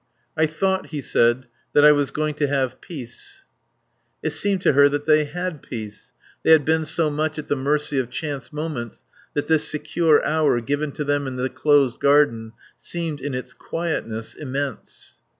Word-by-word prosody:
"I 160 0 +3
thought," 190 +5 -1
he 150 - -5
said, 120 -1 +2 0.3
"that 145 - +6
I 150 - +9
was 145 -2 +2
going 155 0 -2
to 150 -1 0
have 135 -3 -1
peace...." 125 -8 -9 0.8
It 155 - 0
seemed 195 +4 0
to - - +4
her 145 +1 +6
that 145 0 -2
they 155 -1 +4
had 175 0 -4
peace. 110 -4 -8 0.3
They - - 0
had 155 -3 +5
been 160 0 +2
so 155 0 +1
much 155 +1 -1
at 150 - -6
the - - +2
mercy 145 +1 0
of 125 -2 -2
chance 145 +2 -5
moments 150 -7 -5 0.3
that 145 - 0
this 160 -2 +2
secure 155 +1 +2
hour 155 -5 +2
given 145 +5 -2
to 150 - -3
them 145 -1 0
in 130 - -5
the 130 +1 -1
closed 145 -5 +2
garden 130 -6 +3 0.3
seemed, 165 -5 -4
in 140 -1 -3
its 125 - -6
quietness, 115 -10 -4
immense. 140 -3 -6
145 Hz, 180 wpm, -22 LUFS, 130-155 Hz, 0.8 s, I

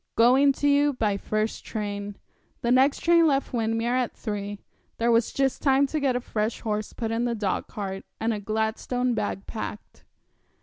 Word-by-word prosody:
'Going 260 +5 +5
to 290 - -1
you 285 0 +4
by 215 -5 0
first 215 +2 -2
train.' 205 -2 -4 0.5
The 235 - 0
next 265 +3 +4
train 335 -1 +5
left 275 -2 0
Windermere 225 0 0
at 255 -2 0
three. 205 -2 -4 0.4
There 235 +1 +2
was 230 0 +3
just 270 -1 0
time 275 0 +4
to 305 +3 -2
get 270 -3 +1
a - - +1
fresh 220 -2 -2
horse 215 -1 -2
put 225 -2 -4
in 230 +1 0
the 235 -1 0
dogcart, 195 -1 -3 0.2
and 225 +1 0
a 210 - -3
Gladstone 220 +4 -1
bag 205 -3 -3
packed. 215 -1 -7
230 Hz, 175 wpm, -26 LUFS, 215-260 Hz, 0.5 s, Going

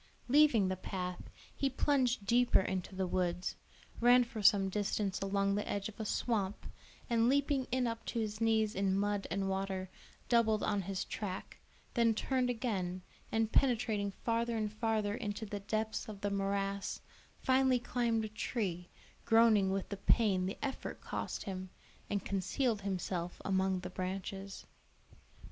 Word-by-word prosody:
Leaving 260 -7 +5
the 185 - 0
path, 180 -1 -5 0.3
he 275 - +1
plunged 255 -5 +1
deeper 240 +1 +4
into 190 0 -3
the 190 0 0
woods, 180 0 -1 0.4
ran 245 +1 +6
for 230 -2 -6
some 195 -1 +5
distance 200 0 -1
along 200 0 +1
the 205 +1 -2
edge 200 -1 -1
of 220 - -14
a 220 - -3
swamp, 210 -3 -1 0.4
and 235 -1 +3
leaping 280 -1 +2
in 255 0 +1
up 230 -1 -3
to - - -4
his 215 0 -3
knees 220 -1 +3
in 195 0 +1
mud 205 0 0
and 195 -1 -1
water, 190 -1 -2 0.4
doubled 225 -3 +3
on 205 -1 +1
his 190 0 -3
track, 195 -3 -5 0.3
then 230 -2 +3
turned 255 +1 0
again, 190 -7 -2 0.3
and 225 0 +1
penetrating 225 -6 +2 0.2
farther 230 0 +1
and 215 -1 -2
farther 215 -2 0
into 210 +1 -4
the 205 0 -4
depths 215 +3 -2
of 200 -2 -8
the 205 - -1
morass, 195 0 -1 0.4
finally 260 -1 +3
climbed 235 -2 0
a - - -5
tree, 200 -5 -3 0.4
groaning 225 -4 +5
with 195 0 -1
the 200 - -4
pain 195 -3 +3
the 195 - -4
effort 270 - -5
cost - - -4
him, 185 -2 -5 0.4
and 200 -2 -1
concealed 200 +4 0
himself 180 -2 -3
among 190 -1 +1
the 180 - -5
branches. 190 +1 -5
205 Hz, 155 wpm, -34 LUFS, 195-230 Hz, 0.4 s, ran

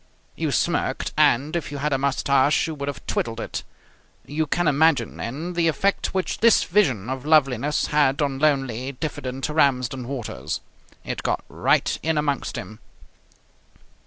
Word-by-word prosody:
You - - -1
smirked - - 0
and, 140 +7 +3
if 165 -4 -3
you 145 - -4
had 145 +1 -1
a - - +2
moustache, 140 +1 +2
you 160 - -4
would 140 -2 -5
have 135 -7 -5
twiddled 115 -1 -2
it. - - -4 0.6
You 155 +2 -2
can 175 +3 0
imagine, 150 +1 +2
then, 155 +9 -4
the 170 -1 +1
effect 195 +6 0
which 190 -1 -2
this 230 -1 +5
vision 140 - +1
of 130 0 -4
loveliness 145 -2 +2
had 145 -2 +2
on 140 -3 0
lonely, 135 -3 0
diffident 135 -2 -4
Ramsden 130 -5 +1
Waters. 80 - -4 0.4
It - - -4
got - - -1
right - - +1
in 160 -1 0
amongst 145 -2 -1
him. 105 +4 -8
140 Hz, 155 wpm, -23 LUFS, 130-155 Hz, 0.6 s, this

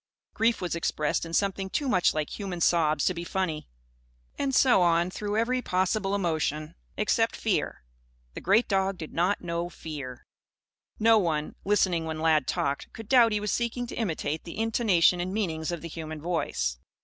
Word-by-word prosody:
Grief 230 +1 +1
was 180 - -2
expressed 165 -1 -1
in 165 - -9
something 195 0 0
too 285 +7 -1
much 185 -8 +3
like 155 -1 -3
human 190 -4 -4
sobs 155 -3 +2
to 185 - +2
be 170 -1 -5
funny. 170 -4 -3 0.7
And 270 -2 -1
so 255 -9 +5
on 170 +1 +3
through 205 +2 -3
every 250 +3 +1
possible 195 0 0
emotion, 155 -4 -1 0.2
except - - +1
fear. - - -1 0.5
The - - -7
great 205 +6 +3
dog 195 -1 +1
did 160 - -8
not 180 +4 +1
know 170 0 -2
fear. 140 -8 -8 0.7
No 225 0 +5
one, 155 -5 -1
listening 185 -5 +2
when 160 -1 -4
Lad 155 -3 +2
"talked," 140 0 -2
could 225 -2 -9
doubt 235 -2 +6
he 210 - +1
was 210 -1 -2
seeking 240 +1 -1
to - - -8
imitate 160 -7 -2
the 170 - -8
intonation 210 -6 +3
and 180 +1 -3
meanings 170 -6 -2
of 170 -1 -5
the - - -4
human 155 -1 -6
voice. 105 - -2
175 Hz, 175 wpm, -27 LUFS, 160-210 Hz, 0.7 s, doubt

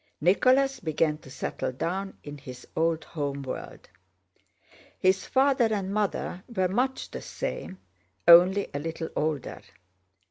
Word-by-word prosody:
—Nicholas 255 - +3
began 155 -2 0
to 135 - -14
settle 130 - -3
down 190 +9 -3
in 145 0 -7
his 130 -2 -10
old 165 0 +1
home 140 -3 -4
world. 130 - -7 1.1
His 190 +1 +2
father 265 -4 +3
and 200 -2 -1
mother 200 -3 -2
were 190 -5 +1
much 255 +7 -1
the - - -6
same, 345 - -5 0.5
only 180 +4 +7
a 140 - -2
little 160 +1 -4
older. 150 -3 -2
180 Hz, 130 wpm, -27 LUFS, 155-205 Hz, 1.1 s, only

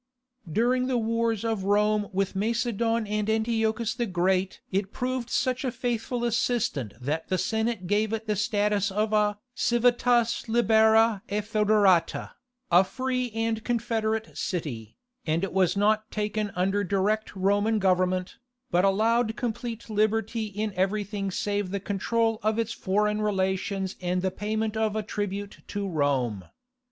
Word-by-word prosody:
During 250 +6 +2
the 255 -2 +1
wars 230 -1 0
of 220 -4 -1
Rome 210 +1 +2
with 195 0 -1
Macedon 230 +1 0
and 210 0 -1
Antiochus 220 0 0
the 240 -1 -2
Great 185 +1 0
it 195 +1 -1
proved 250 -1 -3
such 255 +1 0
a 255 - -1
faithful 240 0 -2
assistant 230 - 0
that 150 +6 -3
the 185 - 0
Senate 220 -1 -1
gave 205 +3 +1
it 225 0 -3
the 210 -1 0
status 205 0 +1
of 215 +2 0
a 210 -1 +2 0.2
civitas 240 -1 +2
libera 220 -2 +4
et 205 +1 -1
foederata, 210 -4 +2 0.4
"a 175 +2 +7
free 255 +3 -2
and 225 -1 -1
confederate 225 -2 -1
city," 130 - -4 0.3
and 160 +3 +1
it 195 - -2
was 185 0 +2
not 215 +1 +2
taken 210 0 -2
under 195 +3 +1
direct 205 +3 0
Roman 205 +3 +2
government, 185 -1 +1 0.3
but 175 +1 +3
allowed 220 +3 +2
complete 235 -1 -4
liberty 220 +1 0
in 210 +1 -3
everything 195 +1 -1
save 205 +1 -2
the 200 +1 -2
control 225 +3 0
of 215 +1 0
its 230 0 -1
foreign 210 +2 0
relations 190 -1 -1
and 180 0 -1
the 190 - +1
payment 215 +2 -2
of 220 -1 0
a 215 - -1
tribute 205 -1 -4
to 205 -1 -3
Rome. 135 - 0
210 Hz, 145 wpm, -27 LUFS, 195-225 Hz, 0.4 s, a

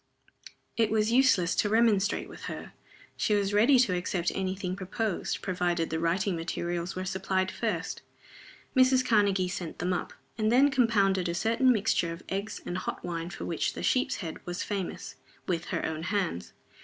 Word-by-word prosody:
It 225 -2 +3
was 220 0 +1
useless 235 -9 +4
to 210 - +2
remonstrate 215 -2 +2
with - - -10
her. - - -7 0.4
She 210 - +1
was 200 0 0
ready 230 +6 +5
to 240 -7 +3
accept 175 0 -1
any 190 -1 -2
thing 185 -1 -3
proposed, 200 +1 -3
provided 175 -3 0
the 160 - -1
writing 180 +3 +1
materials 170 +1 -3
were 185 0 -3
supplied 190 0 -1
first. - - -3 0.7
Mrs. 255 0 +5
Karnegie 200 -5 +3
sent 180 -2 -5
them 180 +2 -1
up, 180 - -3 0.3
and 215 0 +2
then 275 +4 +5
compounded 200 -8 +2
a 170 - -2
certain 230 +7 +3
mixture 205 -6 +1
of 165 +2 -8
eggs 200 +3 -3
and 180 - -3
hot - - -5
wine 170 -1 -3
for - - -7
which 165 - -1
The - - -6
Sheep's 260 +1 +2
Head 160 - -7
was 175 0 -4
famous, 195 -4 -4 0.3
with 170 -3 -1
her - - -2
own 160 0 -3
hands. 185 - -2
190 Hz, 175 wpm, -29 LUFS, 175-220 Hz, 0.7 s, ready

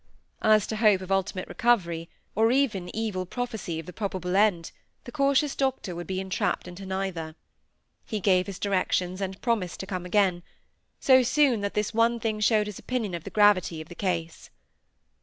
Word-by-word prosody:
As 215 -1 +4
to 220 - -4
hope 210 -4 +4
of 185 0 -7
ultimate 195 -1 -1
recovery, 170 -8 +1 0.2
or 225 +3 +3
even 235 -10 +1
evil 215 -4 -2
prophecy 220 -8 -4
of 165 - -7
the 180 - -9
probable 185 -3 -3
end, 195 -5 +2 0.3
the 240 - -9
cautious 280 +1 +2
doctor 265 -8 -1
would 175 0 -6
be 190 0 -2
entrapped 190 0 -2
into 185 +2 -9
neither. 190 -5 -3 0.7
He 215 - -4
gave 185 -1 +2
his 195 -2 -6
directions, 185 -1 0
and 190 0 -4
promised 215 -8 -1
to - - -6
come 185 -2 -4
again; 185 -2 +2 0.6
so 260 -1 +6
soon, 255 -2 +3
that 200 0 -3
this 210 +1 -1
one 230 +1 +2
thing 220 -1 -2
showed 210 0 +3
his 210 -2 -7
opinion 235 -7 -3
of 170 -2 -5
the - - -5
gravity 205 -6 +3
of 155 - -9
the - - -8
case. 170 -3 -3
195 Hz, 180 wpm, -27 LUFS, 180-225 Hz, 0.7 s, so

